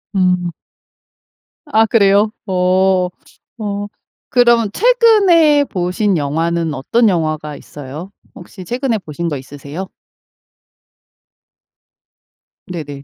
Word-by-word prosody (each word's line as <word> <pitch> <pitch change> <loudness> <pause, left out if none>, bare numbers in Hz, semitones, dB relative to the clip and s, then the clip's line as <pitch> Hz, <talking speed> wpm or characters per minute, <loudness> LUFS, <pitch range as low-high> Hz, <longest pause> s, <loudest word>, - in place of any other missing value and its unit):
음. 180 -2 +1 1.1
아 225 -7 +3
그래요? 205 -1 +3
어. 185 -1 +2 0.5
어. 205 -2 -4 0.4
그럼 235 -3 +3
최근에 390 - +4
보신 185 -1 -1
영화는 165 +2 -1
어떤 215 - +2
영화가 155 -4 -2
있어요? 145 +6 -9 0.2
혹시 180 +1 -11
최근에 245 +2 -1
보신 170 -1 -5
거 150 -4 -2
있으세요? 145 +7 -8 2.8
네네. 145 -6 -7
185 Hz, 180 characters per minute, -16 LUFS, 160-225 Hz, 2.8 s, 최근에